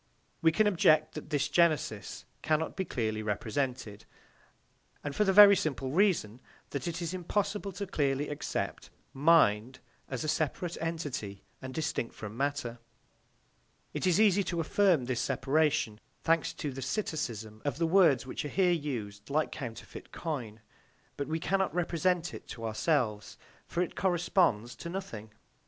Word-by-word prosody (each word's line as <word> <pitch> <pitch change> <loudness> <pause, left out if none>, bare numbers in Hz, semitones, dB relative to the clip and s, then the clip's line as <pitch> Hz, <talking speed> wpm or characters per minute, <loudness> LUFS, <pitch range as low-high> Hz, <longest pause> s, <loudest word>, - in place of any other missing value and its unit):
We 160 - +5
can 215 +7 +3
object 155 -6 +4
that 155 - -8
this 145 -1 +1
genesis 150 - +1 0.2
cannot 155 +1 0
be 190 - -2
clearly 110 -7 -2
represented, 110 0 -3 1.0
and 145 - -3
that - - -12
for 210 - +3
the 195 - +3
very 200 +1 +9
simple 135 -6 -2
reason 160 - +2 0.3
that 140 +5 -3
it 170 +1 -3
is 170 +1 -3
impossible 200 +3 -2
to 200 - -4
clearly 145 -5 0
accept 145 0 -4 0.2
"mind" 130 -6 +4 0.3
as 130 -3 -3
a - - -3
separate 165 +3 -1
entity 145 -12 -4 0.2
and 130 -1 -6
distinct 140 -5 -3
from 110 0 -7
matter. 135 -3 -2 1.1
It - - -1
is 180 +2 +3
easy 205 -2 +5
to 170 - -2
affirm 165 -3 +3
this 125 -1 -1
separation, 135 -4 +1 0.2
thanks 165 -2 +2
to 145 - -4
the 135 +1 -7
psittacism 120 - -3
of 145 -1 -2
the 165 - +1
words, 165 -6 +4
which 130 - -4
are - - -3
here 185 +1 +3
used 115 -11 -4
like 155 +2 +1
counterfeit 115 -6 -8
coin, 120 -10 -5 0.5
but 140 - -4
we 160 +1 -1
cannot 190 +1 0
represent 175 0 0
it - - -9
to 115 - -7
ourselves, 110 -2 0 0.3
for 175 - 0
it 180 - -6
corresponds 175 - +1
to 170 - -7
nothing. 145 - -6
150 Hz, 155 wpm, -30 LUFS, 120-175 Hz, 1.1 s, very